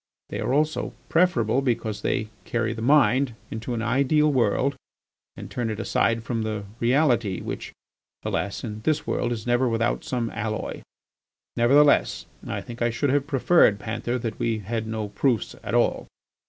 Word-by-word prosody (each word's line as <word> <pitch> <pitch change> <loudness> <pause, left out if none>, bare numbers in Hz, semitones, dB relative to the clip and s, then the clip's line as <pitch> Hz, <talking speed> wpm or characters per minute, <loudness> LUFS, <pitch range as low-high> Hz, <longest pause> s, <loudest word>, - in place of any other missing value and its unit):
They - - -4
are - - -1
also 150 +3 0 0.2
preferable 135 - +3
because 115 -5 -1
they 110 - -1
carry 115 -1 -1
the 110 - -7
mind 130 -1 +3 0.2
into 115 +2 -4
an 115 - -2
ideal 140 +5 +3
world 130 +3 +2 0.6
and - - -7
turn 120 -2 -2
it 110 -1 -4
aside 115 0 +1
from 115 -1 -2
the 110 -2 -3 0.2
reality 120 - +2
which, - - -6 0.5
alas! 100 - -2
in 110 -2 -5
this 155 +6 0
world 120 - -1
is 110 -2 -4
never 120 +1 +2
without 115 0 0
some 120 -3 -2
alloy.... 110 0 -4 0.7
Nevertheless, 120 -7 +4 0.2
I 100 -2 -3
think 120 +2 -10
I 120 - +3
should 130 +4 0
have 145 0 +1
preferred, 135 -5 +4
Panther, 115 +4 -3
that 115 -2 -4
we 115 -1 0
had 110 +2 -3
no 110 -1 -3
proofs 115 +3 0
at - - -3
all." - - +1
120 Hz, 165 wpm, -25 LUFS, 110-130 Hz, 0.7 s, Nevertheless